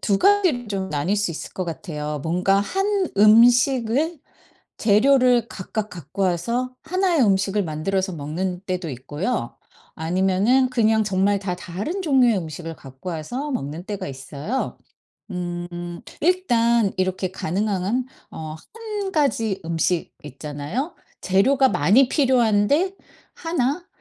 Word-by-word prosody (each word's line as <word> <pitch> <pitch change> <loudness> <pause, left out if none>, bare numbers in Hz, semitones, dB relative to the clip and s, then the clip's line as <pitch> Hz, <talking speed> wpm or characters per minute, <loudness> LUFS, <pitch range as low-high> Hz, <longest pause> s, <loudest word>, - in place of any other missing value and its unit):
2 200 -2 +1
가지를 355 - +3
좀 190 -2 -3
나뉠 155 +8 0
수 205 -4 0
있을 160 - -7
것 185 - -3
같아요. 150 -4 -5
뭔가 180 +5 +2
1 390 - 0
음식을 245 - +4 0.6
재료를 245 +2 +4
각각 210 +2 -5
갖고 175 +3 -5
와서 235 +9 -1
1 370 +1 +1
의 285 - +4
음식을 195 0 +2
만들어서 185 +4 -2
먹는 175 +5 -3
때도 180 -2 -3
있고요. 145 - -3 0.4
아니면은 190 +10 +2
그냥 220 -3 +3
정말 200 0 +1
다 185 -2 -3
다른 205 - -4
종류의 255 - +4
음식을 165 0 -6
갖고 135 +6 -9
와서 240 - -4
먹는 160 - -4
때가 205 -7 -4
있어요. 140 - -4 0.5
음 175 -1 -5 0.2
일단 235 - +2
이렇게 185 0 -1
가능한 200 +6 -1 0.2
어 155 -1 -7 0.2
1 420 -4 -4
가지 225 - +1
음식 170 +1 -1
있잖아요? 150 - -5 0.3
재료가 260 +9 +4
많이 215 - +4
필요한데 260 - +2 0.4
1 325 0 -1
200 Hz, 240 characters per minute, -23 LUFS, 175-255 Hz, 0.6 s, 음식을